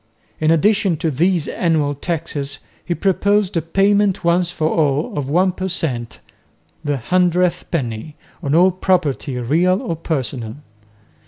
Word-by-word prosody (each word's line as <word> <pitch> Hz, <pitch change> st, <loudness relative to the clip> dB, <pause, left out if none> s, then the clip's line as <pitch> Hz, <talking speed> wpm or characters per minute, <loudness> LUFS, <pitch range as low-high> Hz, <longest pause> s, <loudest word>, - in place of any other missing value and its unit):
In 155 Hz, -, +2 dB
addition 190 Hz, +1 st, +3 dB
to 160 Hz, 0 st, -1 dB
these 165 Hz, +2 st, +1 dB
annual 155 Hz, -4 st, 0 dB
taxes 145 Hz, -2 st, -4 dB, 0.3 s
he 175 Hz, -, -2 dB
proposed 200 Hz, +1 st, +1 dB
a 165 Hz, -, +2 dB
payment 195 Hz, +3 st, +2 dB
once 170 Hz, +1 st, +2 dB
for 165 Hz, -3 st, -1 dB
all 150 Hz, -2 st, 0 dB
of 140 Hz, -2 st, -3 dB
one 180 Hz, +5 st, +3 dB
per 185 Hz, +1 st, -4 dB
cent., 130 Hz, -10 st, -4 dB, 0.7 s
"the 145 Hz, -1 st, -1 dB
hundredth 180 Hz, +5 st, +1 dB
penny," 130 Hz, -1 st, -3 dB, 0.3 s
on 140 Hz, +2 st, 0 dB
all 180 Hz, +3 st, +5 dB
property, 160 Hz, -7 st, 0 dB
real 170 Hz, +10 st, +2 dB
or 220 Hz, -10 st, -3 dB
personal. 130 Hz, -8 st, -4 dB
165 Hz, 140 wpm, -19 LUFS, 145-185 Hz, 0.7 s, all